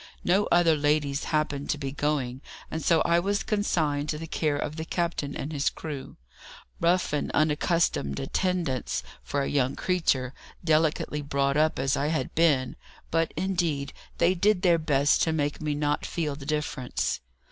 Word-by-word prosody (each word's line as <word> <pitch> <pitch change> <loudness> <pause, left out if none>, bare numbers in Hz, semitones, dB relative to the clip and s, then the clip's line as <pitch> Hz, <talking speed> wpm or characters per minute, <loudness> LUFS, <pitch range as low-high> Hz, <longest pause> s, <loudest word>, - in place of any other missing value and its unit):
No 195 +4 +3
other 170 -2 +5
ladies 145 -1 +1
happened 150 -2 -1
to - - +1
be 135 -2 -4
going, 140 -3 -1 0.3
and 160 -1 -3
so 165 -2 +4
I 170 0 +3
was 200 +3 0
consigned 155 -8 0
to 150 - -1
the 165 - -6
care 155 -2 0
of 150 +1 -3
the 160 - -3
captain 165 -4 -2
and 150 +3 -5
his 140 -1 +1
crew 150 -4 -7 0.6
rough 175 -1 +2
and 145 - -1
unaccustomed 155 - +1
attendants 150 - -1 0.2
for 140 -1 -2
a - - -2
young 135 -2 +1
creature, 140 -8 0 0.3
delicately 155 -2 +1
brought 140 -1 0
up 155 +1 +2
as 135 +1 +1
I 145 - 0
had 155 0 -1
been; 145 -6 +2 0.3
but, 165 0 +1
indeed, 170 -6 -1 0.2
they 180 - +4
did 200 +1 +2
their 170 -3 +5
best 145 -2 +2
to 160 - +2
make 145 -1 -1
me 150 -1 -1
not 145 0 0
feel 155 -4 -2
the 140 -1 -10
difference. 150 -4 -2
150 Hz, 170 wpm, -27 LUFS, 140-170 Hz, 0.6 s, other